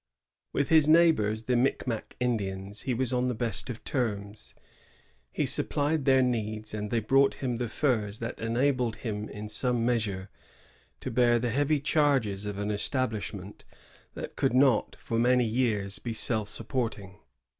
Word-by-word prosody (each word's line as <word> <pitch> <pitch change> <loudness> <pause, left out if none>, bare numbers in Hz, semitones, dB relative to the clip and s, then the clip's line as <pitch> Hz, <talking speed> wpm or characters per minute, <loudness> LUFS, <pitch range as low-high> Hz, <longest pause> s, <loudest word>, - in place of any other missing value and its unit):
^ - - -62 0.5
With 140 - -1
Ins 155 -2 +6
neighbors, 155 -10 +4
the 125 +2 0
Micmac 120 -2 -1
Indians, 100 -4 -2
he - - +2
was 130 +1 -1
on 125 0 +1
the 125 - -1
best 115 +2 -2
of 120 -2 -6
terms. 105 -5 -3 0.8
He - - -1
supplied 145 0 0
their 130 -1 +5
needs, 110 -3 -2
and 105 -1 -3
they 115 - +1
brought 135 +5 +3
him 125 -3 -2
the 120 0 -2
furs 110 -4 0
that 115 +1 -5
enabled 120 0 +1
him 105 -2 -5
in 105 +1 -7
some 120 +2 0
measure 105 -6 -1 0.7
to - - -4
bear 120 0 +4
the 120 0 -1
heavy 145 +4 +2
charges 135 -10 +1
of 105 -1 -4
an 105 +1 -2
establish 110 0 -1
ment 100 0 -10 0.5
that - - -7
could 135 -3 +1
not 130 -4 +3
for 115 - -3
many 125 +1 +4
years 110 -4 0
be 115 - -4
self 110 -2 -1
support 125 0 -2
ing. 95 -2 -13
115 Hz, 165 wpm, -28 LUFS, 105-130 Hz, 0.8 s, Ins